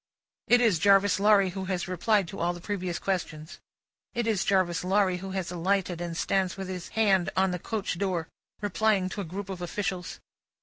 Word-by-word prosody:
It 245 0 +5
is 215 -9 +3
Jarvis 200 0 +4
Lorry 200 -2 +4
who 190 +1 -5
has 185 -1 -2
replied 195 +2 +1
to 195 - -8
all 175 +1 +1
the 175 - -9
previous 180 -2 -3
questions. 165 -5 -4 0.6
It 240 -1 0
is 215 -4 +1
Jarvis 185 -4 +1
Lorry 190 -1 +2
who 190 +2 -7
has 190 -3 -3
alighted 180 0 -1
and 170 -1 -4
stands 190 +1 0
with 190 -1 -5
his 180 -2 -5
hand 195 -5 +3
on 190 0 +3
the 180 - -3
coach 200 -3 -3
door, 180 -5 -1 0.3
replying 205 -1 +1
to 200 - -4
a - - -5
group 190 +4 -6
of 190 -2 -6
officials. 180 0 -3
190 Hz, 190 wpm, -28 LUFS, 175-200 Hz, 0.6 s, It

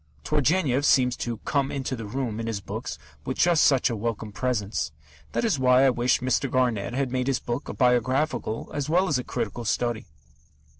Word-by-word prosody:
Turgenev 145 - +2
seems 125 -3 +4
to 120 -1 -3
"come 140 -2 0
into 135 -1 -3
the 115 -3 -7
room" 120 -1 -3
in 115 - -3
his 110 -3 -2
books - - -6 0.3
with - - -4
just 170 -3 +4
such 135 -3 +4
a - - -1
welcome 110 0 -3
presence. 105 -6 -2 0.4
That - - 0
is 190 -12 +1
why 130 +1 +5
I 135 - +5
wish 120 +1 +1
Mr. 130 +2 +1
Garnett 120 -4 0
had 135 -2 -1
made 125 0 -1
his 135 -2 +2
book 120 +3 -4
a - - -4
biographical, 125 -1 +1
as 145 0 -3
well 180 +4 +3
as 145 -6 +1
a - - -4
critical, 120 -1 -4
study. 120 0 -1
125 Hz, 195 wpm, -26 LUFS, 115-135 Hz, 0.4 s, why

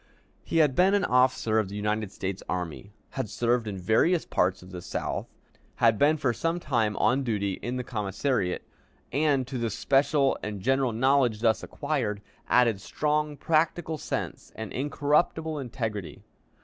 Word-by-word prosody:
He - - -2
had 150 -4 +4
been 190 +7 +4
an 200 - +2
officer 125 -3 +3
of 105 -3 -1
the 100 - -7
United 105 0 -1
States 95 -1 -4
Army, 90 +2 -4 0.2
had 130 -5 -3
served 120 +1 0
in 100 -2 -4
various 110 - +2
parts 90 0 0
of 90 - -13
the 90 -2 -7
South, - - -3 0.5
had 115 -3 +3
been 150 +2 +4
for 130 -5 +1
some 165 +8 -1
time 115 -9 0
on 130 +2 +3
duty 100 -5 -1
in 120 +3 -3
the 125 - -2
commissariat, 105 -2 -1 0.5
and, 140 -1 +2
to 130 0 -5
the 115 -1 0
special 135 +5 +2
and 105 -1 -4
general 130 +3 +1
knowledge 125 -2 +2
thus 110 -3 +2
acquired, 105 -1 -2 0.3
added 115 -5 +3
strong 150 +4 -1
practical 160 0 0
sense - - -4
and 110 -2 -6
incorruptible 150 +3 0
integrity. 110 -7 -5
120 Hz, 160 wpm, -27 LUFS, 105-145 Hz, 0.5 s, had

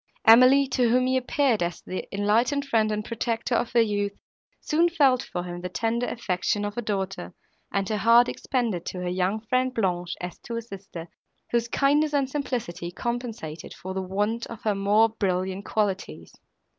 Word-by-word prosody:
Emily, 255 +5 +7
to 250 -2 +2
whom 250 +2 +3
he 260 0 +1
appeared 260 - +1
as 175 0 -2
the 185 - -5
enlightened 225 +8 +1
friend 220 -5 +2
and 210 0 -2
protector 230 +1 -2
of 235 0 0
her 235 - +5
youth, 205 -2 -1 0.4
soon 335 +3 +2
felt 275 -7 +3
for 175 - -5
him 175 0 -6
the 180 - -4
tender 230 +5 -1
affection 205 -1 -1
of 205 0 -4
a 240 - -2
daughter, 195 -4 -4 0.4
and 195 -1 0
her 215 - -1
heart 230 +3 +6
expanded 230 -10 -2
to 180 - -4
her 180 - -2
young 185 +4 0
friend 255 +3 0
Blanche, 180 -5 -1
as 180 -1 -6
to 235 - -7
a - - -2
sister, 195 -6 -9 0.4
whose 235 0 +1
kindness 290 +4 +2
and 275 -2 +1
simplicity 245 - -3
compensated 230 -6 -5
for 190 +1 -7
the 190 - -2
want 205 +5 -2
of 230 -1 -10
more 205 +3 +4
brilliant 190 -2 -2
qualities. 190 - -2
220 Hz, 175 wpm, -26 LUFS, 190-245 Hz, 0.4 s, Emily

